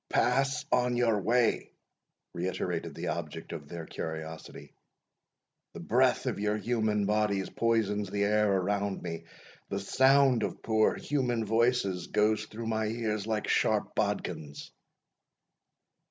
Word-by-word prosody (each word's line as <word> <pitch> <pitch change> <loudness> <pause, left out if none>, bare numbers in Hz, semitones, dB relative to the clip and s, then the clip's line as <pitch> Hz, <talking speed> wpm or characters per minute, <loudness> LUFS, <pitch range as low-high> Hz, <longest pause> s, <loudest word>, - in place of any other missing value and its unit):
"Pass 135 +3 +1
on 125 -1 +2
your 115 -4 +2
way," 120 +3 +2 0.6
reiterated 90 +1 -3
the - - -3
object 80 0 -5
of 75 -3 -7
their 85 +1 -7
curiosity, 80 0 -7 1.0
"the - - -6
breath - - +2
of - - -2
your 105 +1 0
human 110 -2 0
bodies 105 -2 0
poisons 105 -3 0
the 100 +1 0
air 105 0 +3
around 100 +1 -1
me 85 0 -5 0.4
the - - -2
sound 135 -1 +4
of - - -4
pour 110 -1 +2
human 125 -6 -1
voices 110 -5 +1
goes 105 0 +1
through 115 +2 -7
my 110 -1 0
ears 110 -2 -2
like 110 -2 -1
sharp - - +1
bodkins." 70 -2 -3
105 Hz, 125 wpm, -30 LUFS, 95-115 Hz, 1.0 s, sound